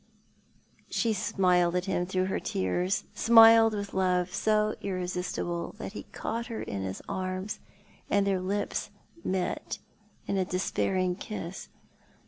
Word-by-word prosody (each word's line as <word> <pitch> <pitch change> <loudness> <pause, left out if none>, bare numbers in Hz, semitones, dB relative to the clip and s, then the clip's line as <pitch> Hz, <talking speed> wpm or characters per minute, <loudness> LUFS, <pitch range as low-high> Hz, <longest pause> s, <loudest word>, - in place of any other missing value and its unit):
She 230 -2 +1
smiled 180 -3 +2
at 180 0 0
him 185 -2 -1
through 185 0 0
her 190 - -1
tears 175 - 0
— - - -32
smiled 225 -1 +7
with 200 -1 -4
love 180 -1 +1
so 215 +1 +2
irresistible 180 -2 -3
that - - -6
he - - -8
caught 230 +1 -3
her 230 -2 -4
in 100 - -4
his 95 0 -5
arms 185 +1 -3 0.5
and 200 0 +3
their 195 -2 +1
lips 200 +3 -2 0.3
met 185 -1 -2 0.5
in 200 - -1
a - - +3
despairing 185 0 0
kiss. 195 -4 -6
185 Hz, 135 wpm, -29 LUFS, 180-205 Hz, 0.5 s, smiled